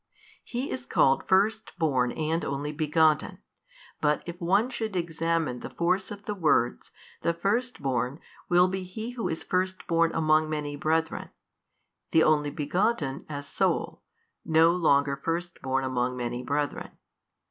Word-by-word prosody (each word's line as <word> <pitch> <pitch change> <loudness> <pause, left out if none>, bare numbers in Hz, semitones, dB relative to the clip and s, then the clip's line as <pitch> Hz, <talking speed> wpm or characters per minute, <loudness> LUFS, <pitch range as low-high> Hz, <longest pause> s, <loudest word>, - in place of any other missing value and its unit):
He 250 +3 -4
is 125 -1 -5
called 135 +1 +3
First 215 +4 +2
born 130 -7 +1
and 160 +1 -1
Only 140 +2 -3
Begotten, 155 0 +2 0.6
but 150 0 +2
if 175 +1 -8
one 205 +8 +2
should 220 -4 -4
examine 165 -5 -1
the - - -7
force 180 +3 0
of 205 0 -9
the 210 - -2
words, 155 -10 +1 0.3
the 170 - 0
First 210 - -1
born 130 +2 -1 0.3
will 175 +1 +5
be 190 +1 -3
He 220 +6 -6
Who 245 -2 -3
is 160 - -4
First 185 +1 -1
born 165 -1 +2
among 155 -1 +3
many 150 -1 -3
brethren, 160 +2 -1 0.8
the 160 - +4
Only 150 -1 +3
Begotten 150 0 -1
as 145 -1 -5
Sole, - - -1 0.4
no 160 +1 +5
longer 140 -5 +3
First 170 +5 -4
born 135 0 0
among 125 -1 -1
many 120 0 -3
brethren. 145 +2 -3
160 Hz, 145 wpm, -27 LUFS, 145-180 Hz, 0.8 s, will